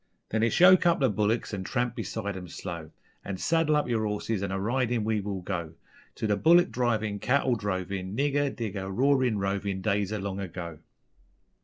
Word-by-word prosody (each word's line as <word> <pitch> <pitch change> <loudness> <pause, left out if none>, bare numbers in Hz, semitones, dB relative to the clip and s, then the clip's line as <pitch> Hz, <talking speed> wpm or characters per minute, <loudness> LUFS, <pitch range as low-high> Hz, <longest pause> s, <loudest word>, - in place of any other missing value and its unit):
_Then 110 0 +1
it's 115 - +2
yoke 185 0 +7
up 170 - +3
the 135 -5 +3
bullicks 105 +3 0
and 95 -2 -3
tramp 120 +3 -1
beside 100 -4 -4
'em 90 -1 -7
slow, 85 -2 -7 0.3
An' 95 -1 -4
saddle 165 - +2
up 150 - +1
yer 115 -3 0
horses 105 0 -2
an' 100 -1 -2
a 95 - -2
ridin' 120 +2 0
we 110 -1 0
will 100 -2 -4
go, 85 -4 -4 0.4
To - - -3
the 105 -1 +2
bullick 170 - +5
drivin', 110 -4 0
cattle 130 +2 +2
drovin', 95 -2 -3
Nigger, 145 0 +1
digger, 100 -6 -4
roarin', 130 +1 +2
rovin' 100 0 -2
Days 100 0 0
o' 110 - -1
long 100 -1 -4
ago. 85 -4 -6
105 Hz, 185 wpm, -28 LUFS, 95-125 Hz, 0.4 s, yoke